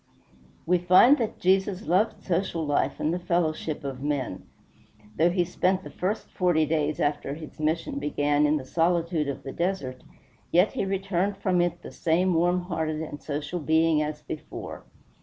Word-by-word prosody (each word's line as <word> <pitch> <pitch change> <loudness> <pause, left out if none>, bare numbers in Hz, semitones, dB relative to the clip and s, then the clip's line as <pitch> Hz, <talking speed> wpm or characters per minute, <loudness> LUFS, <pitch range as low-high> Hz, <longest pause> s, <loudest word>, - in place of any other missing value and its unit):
We 180 +1 +3
find 185 - +6
that 225 -3 -2
Jesus 190 +1 +2
loved 190 +6 +1
social 170 -2 -1
life 145 -1 0
and 155 - 0
the 180 - -1
fellowship 160 -3 -1
of 135 -2 -5
men. 140 -9 -3 0.7
Though 165 +3 +4
he 175 0 +2
spent 185 +2 0
the - - -9
first 200 +4 -2
forty 175 -4 +2
days 155 -1 0
after 145 -1 -1
his 155 -1 -11
mission 155 -1 -1
began 145 0 +1
in 150 +1 +2
the 135 - -6
solitude 165 0 +1
of 140 -1 -4
the 135 - -6
desert, 170 -8 -2 0.5
yet 180 +4 +4
he - - -1
returned 195 0 -1
from 185 -3 +1
it 175 0 -1
the - - -8
same 175 +3 +1
warm 175 +2 +2
hearted 160 -3 -2
and 145 -2 -8
social 150 +4 -4
being 160 0 +3
as 150 0 -4
before. 155 - -7
165 Hz, 170 wpm, -26 LUFS, 150-180 Hz, 0.7 s, find